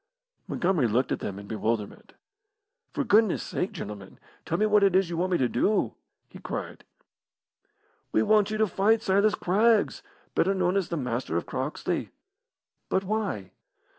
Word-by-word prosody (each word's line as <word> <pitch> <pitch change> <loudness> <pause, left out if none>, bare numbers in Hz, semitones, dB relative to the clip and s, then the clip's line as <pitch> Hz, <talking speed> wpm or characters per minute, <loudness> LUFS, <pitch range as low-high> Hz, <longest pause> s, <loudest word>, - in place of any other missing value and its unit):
Montgomery 175 -8 +1
looked 120 +4 +1
at - - 0
them 100 - -5
in 100 - -9
bewilderment. 110 0 -3 0.8
"For 290 - -1
goodness' 220 -4 +3
sake, 185 - -3
gentlemen, 105 - -8 0.3
tell - - 0
me 215 - +2
what 210 -1 +4
it 195 -2 +4
is 190 -2 +3
you 170 - -3
want 185 +2 0
me - - +4
to 130 - +2
do!" 205 - +1 0.3
he - - -13
cried. - - -6 1.3
"We - - +3
want 215 -1 +3
you 215 - -2
to 220 - +3
fight 215 +3 +2
Silas 200 +2 +3
Craggs, 215 +4 +2 0.3
better 195 +3 +2
known 180 0 +1
as 195 -3 0
the 170 - -2
Master 125 - -2
of 85 - -2
Croxley." 135 +4 -3 0.8
"But 190 - +1
why?" 195 - -3
185 Hz, 165 wpm, -27 LUFS, 125-210 Hz, 1.3 s, what